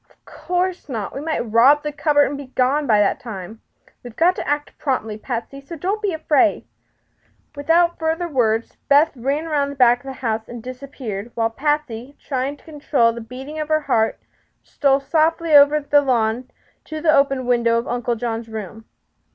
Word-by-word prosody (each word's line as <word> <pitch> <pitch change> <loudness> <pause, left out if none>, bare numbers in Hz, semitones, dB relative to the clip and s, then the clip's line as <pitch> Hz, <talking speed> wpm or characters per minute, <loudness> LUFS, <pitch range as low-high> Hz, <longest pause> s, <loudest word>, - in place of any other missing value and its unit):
"Of - - -31
course 360 +1 -3
not. 220 -6 -4
West 280 +3 -6
might 320 - 0
rob 255 +7 +5
the 300 - -3
cupboard 290 -1 +3
and 285 - -4
be 280 -1 -8
gone 265 +3 0
by 215 -3 +4
that 205 - +1
time. 220 -1 -8 0.4
We've 240 -3 -11
got 355 +3 +3
to - - -5
act 290 0 -2
promptly, 240 -6 -2
Patsy; 240 +4 -6
so 305 +5 -9
don't 385 +7 -2
be 410 -2 0
afraid." 315 -1 +1 0.9
Without 335 +4 +2
further 325 +2 -1
words 230 -6 0
Beth 295 +3 +5
ran 275 +6 -2
around 290 -3 0
the 280 - -7
back 245 -2 +4
of 245 - -22
the 270 - -5
house 225 -4 -3
and 235 -2 -8
disappeared, 250 -5 -7
while 225 -1 0
Patsy, 285 -2 -2
trying 270 +1 -3
to - - -24
control 285 -6 +1
the 235 - -7
beating 265 +7 -8
of 305 - -3
her 310 0 +1
heart, 225 -6 0 0.4
stole 275 -2 +1
softly 320 +2 +1
over 290 +1 +7
the 290 0 +3
lawn 245 -2 0 0.4
to 310 0 -6
the 310 0 +3
open 275 -2 +2
window 235 -1 +2
of 235 - -2
Uncle 245 0 -1
John's 230 0 -4
room. 220 0 -8
275 Hz, 185 wpm, -21 LUFS, 235-300 Hz, 0.9 s, over